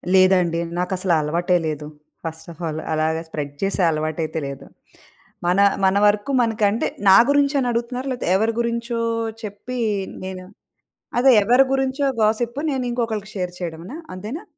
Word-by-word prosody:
లేదండి. 180 -3 +4 0.2
నాకసలా 180 -1 +1
అలవాటే 175 +4 +1
లేదు. 150 -1 -4 0.4
ఫస్ట్ 160 0 -6
ఆఫ్ 165 - -13
ఆల్ 155 0 -3
అలాగా 160 +1 0
స్ప్రెడ్ 145 -3 -5
చేసే 195 -1 0
అలవాటైతే 155 +1 -2
లేదు. 140 -1 -8 0.8
మన, 180 +3 +3 0.3
మన 190 +1 +3
వరకు 205 +6 +1
మనకంటే 220 -2 +1 0.2
నా 190 - +9
గురించని 280 -2 +2
అడుగుతున్నారా? 245 +3 -3
లేపోతే, 245 - -3
ఎవరి 220 +3 +1
గురించో 235 0 -2 0.4
చెప్పీ, 230 +5 -6 0.4
నేనా? 185 -1 -7 0.7
అదే, 265 +1 +6
ఎవరి 250 +5 +5
గురించో 270 +1 0
గాసిప్పు, 235 +5 +1
నేనింకొకళ్ళకి 235 -5 -2
షేర్ 180 -2 -3
చేయడమనా? 175 - -6 0.2
అంతేనా? 230 - -6
200 Hz, 130 wpm, -22 LUFS, 170-240 Hz, 0.8 s, నా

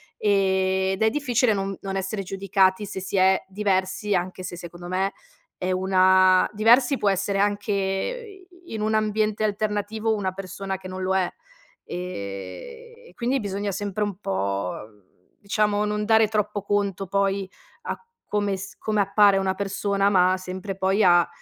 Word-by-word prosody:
ehm, 190 -2 +2
ed 205 - -1
è 220 - +5
difficile 250 -3 +1
non 195 -1 -3
non 195 0 -3
essere 195 +1 -3
giudicati 195 +1 +1
se 190 - -6
si 190 - -3
è 190 0 +4
diversi, 195 0 0
anche 185 +1 -3
se, 180 - -6
secondo 175 0 -9
me 190 +2 0 0.5
è 185 0 -2
una 185 0 +4
diversi 240 +5 +4
può 205 - +2
essere 195 +1 0
anche, 205 +1 0
i 355 - -4
in 220 - -3
un 215 +1 0
ambiente 215 0 0
alternativo, 215 +1 -1
una 195 -3 -1
persona 195 +1 -5
che 185 0 -10
non 185 0 -5
lo 190 +1 +1
è. 180 -2 +1 0.6
Ehm, 175 - -7
e - - -17
quindi 250 +3 0
bisogna 200 -1 -3
sempre 205 +1 -2
un 205 -3 -3
po', 100 - -2 0.7
diciamo, 210 0 +1
non 210 0 -1
dare 220 0 +5
troppo 210 -2 -1
conto 200 -1 -1
poi 195 0 0 0.4
a - - -4 0.3
come 205 -2 0
s 190 0 -8
come 215 -1 0
appare 200 0 +4
una 190 -1 +1
persona, 200 0 0
ma 185 -1 +4
sempre 185 +2 -6
poi 195 +2 +2
a, 175 -2 +5
195 Hz, 160 wpm, -24 LUFS, 190-210 Hz, 0.7 s, è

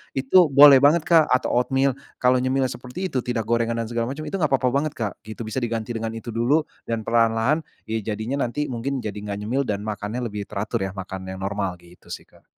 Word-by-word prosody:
Itu 145 +6 +5
boleh 140 -1 +8
banget, 150 +4 +4
Kak, 165 -3 +5
atau 125 0 +1
oatmeal. 135 +2 +1 0.2
Kalau 125 0 +3
nyemil 130 +1 +1
seperti 130 +10 -6
itu 130 - 0
tidak 120 -2 -2
gorengan 115 +1 0
dan - - -6
segala 115 0 -1
macem, 155 +2 -6
itu 155 +5 -4
enggak 155 -5 +1
apa-apa 130 -2 +2
banget, 145 +2 0
Kak. 105 -5 -3
Itu 110 +1 -6
bisa 110 +4 -3
diganti 115 -1 -3
dengan 115 -1 -4
itu 115 +1 -6
dulu, 125 +8 +2 0.2
dan 115 -1 -2
perlahan-lahan, 115 +6 +2 0.2
ya 110 0 -3 0.2
jadinya 120 +7 -3
nanti 150 +5 -3
mungkin 130 +2 -3
jadi 105 -2 -4
nggak 100 -1 -5
nyemil, 130 +5 0
dan 105 0 -2
makannya 110 +3 -4
lebih 105 -1 -5
teratur 105 +1 -3
ya, - - -7
makan 95 0 -7
yang 95 0 -6
normal. 100 -2 -2
Gitu 85 0 -20
sih, - - -7
Kak. - - -24
120 Hz, 220 wpm, -23 LUFS, 110-135 Hz, 0.2 s, boleh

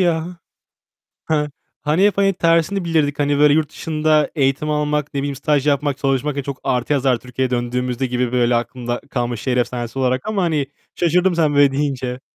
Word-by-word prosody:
ya. 165 -3 +1 1.0
He, 150 -1 +1 0.3
hani 155 +6 +2
hep 205 -1 +2
hani 195 0 +4
tersini 170 +2 +1
bilirdik. 155 -4 0
Hani 145 -1 +1
böyle 145 0 +5
yurt 155 -1 +1
dışında 155 -1 +1
eğitim 140 0 0
almak, 150 -1 -1
ne 140 - 0
bileyim 140 0 -3
staj 145 +1 0
yapmak, 145 -1 +1
çalışmak, 140 +1 -1
çok 140 -1 -6
artı 125 +3 0
yazar 135 -3 +2
Türkiye'ye 125 +1 -3
döndüğümüzde 125 +1 -1
gibi 125 -1 -1
böyle 120 -1 +2
aklımda 120 0 -2
kalmış 120 -3 -2
şehir 130 -2 0
efsanesi 120 0 -2
olarak 130 0 0
ama 215 -3 -1
hani 155 -5 0 0.3
şaşırdım 180 +2 +2
sen 155 -3 +2
böyle 140 -1 +5
deyince. 130 -3 -2
145 Hz, 175 wpm, -19 LUFS, 125-155 Hz, 1.0 s, böyle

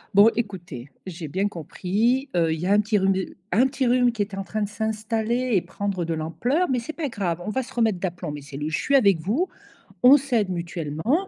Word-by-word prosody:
"bon 205 +3 +8
écoutez, 180 - -5 0.2
j'ai 170 -3 -6
bien 190 +7 0
compris, 210 - -1
heu, 165 -2 +3
il 160 - -4
y 175 - -3
a 195 - +2
un 205 - +5
petit 210 0 +1
rhume 190 0 +3
de 190 0 -4
un 240 +8 +4
petit 265 -1 -1
rhume 245 0 +4
qui 225 -3 -3
est 200 0 -11
en 195 - -3
train 215 +2 -4
de 200 - -3
s'installer 220 +3 -1
et 190 - +4
prendre 190 +1 -3
de 165 - -2
l'ampleur, 245 - 0
mais 250 - +2
c'est 235 +7 -6
pas 315 -2 -3
grave, 180 -7 -2
on 210 - -3
va 260 - 0
se - - -12
remettre 220 -6 +1
d'aplomb, 175 -3 -4
mes 145 0 -6
cellules, 145 +2 -5
je 160 - 0
suis 280 - +1
avec 200 -10 +5
vous, 235 - 0 0.6
on 265 +3 +9
s'aide 240 -8 0
mutuellement 175 - -1
205 Hz, 235 wpm, -24 LUFS, 175-240 Hz, 0.6 s, on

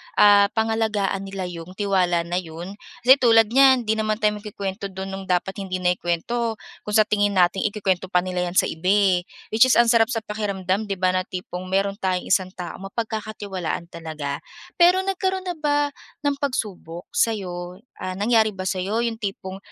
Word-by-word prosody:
ah, 205 -1 +7
pangalagaan 220 -3 0
nila 195 -1 -5
'yong 170 +2 -9
tiwala 185 -4 +1
na 175 +2 -2
'yon, 175 +4 -9 0.2
kasi 260 +3 +7
tulad 225 -2 +5
niyan 265 -1 +6
hindi 220 0 0
naman 215 0 -1
tayo 210 0 +2
magkukuwento 200 -1 -5
do'n 190 0 -7
no'ng 195 0 -7
dapat 185 +2 0
hindi 185 -2 -4
na 180 - +4
ikuwento 220 +7 -1 0.3
kung 210 - -1
sa 215 - +7
tingin 205 -1 +1
nating 185 +3 +3
ikukuwento 190 -3 -1
pa 180 -1 +1
nila 180 -1 -2
'yan 175 - -6
sa - - +3
iba 165 +3 -5
eh. 190 -3 +3 0.2
Which 230 +4 +6
is 255 - +4
ang 235 0 +5
sarap 225 -1 +4
sa 225 -3 -3
pakiramdam, 205 -1 -2
'di 195 - -2
ba, 185 0 +3
na 185 0 0
tipong 180 0 -6
mayroon 195 +1 0
tayong 185 -3 -2
isang 185 -1 +1
tao 175 -3 -7
mapagkakatiwalaan 200 -4 -4
talaga. 155 -4 -5 0.4
Pero 360 +2 +5
nagkaroon 380 0 -1
na 360 -3 -5
ba 290 -1 +1 0.3
ng 285 -1 +1
pagsubok 205 - -4
sa 225 - +2
'yo? 180 -1 -6 0.2
Ah 185 0 -4
nangyari 220 +2 +2
ba 190 - -7
sa 190 - -1
'yo 205 +5 -1
'yong 230 -1 -2
tipong 195 -3 -5
200 Hz, 190 wpm, -23 LUFS, 185-225 Hz, 0.4 s, ah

